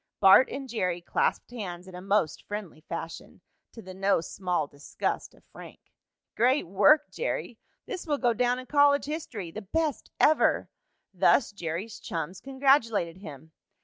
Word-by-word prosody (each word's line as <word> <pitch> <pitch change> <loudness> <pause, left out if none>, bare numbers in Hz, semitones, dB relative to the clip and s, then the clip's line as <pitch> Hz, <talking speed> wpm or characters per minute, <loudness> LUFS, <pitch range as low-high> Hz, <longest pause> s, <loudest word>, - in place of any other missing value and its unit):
Bart 195 +6 +7
and 275 -1 -6
Jerry 185 -7 -1
clasped 175 - -1
hands 185 -6 -6
in 185 - -11
a 180 - -8
most 195 -4 0
friendly 205 -7 -6
fashion, 165 0 -7 0.3
to 225 - -11
the 185 - -9
no 195 0 +2
small 175 -1 -2
disgust 145 0 -4
of - - -23
Frank. - - -12 0.6
"Great 255 +5 +3
work, 205 - +4
Jerry!" - - -4 0.3
"This 370 -6 -6
will 295 -2 +1
go 245 -3 +2
down 245 +2 +1
in 255 - -7
college 285 0 +4
history!" 255 - -5
"The 215 - -7
best 305 - -2
ever!" 310 - +3 0.4
Thus 240 - +3
Jerry's 185 +3 -5
chums 170 -1 -5
congratulated 260 - +2
him. 160 -4 -11
205 Hz, 150 wpm, -28 LUFS, 175-265 Hz, 0.6 s, Bart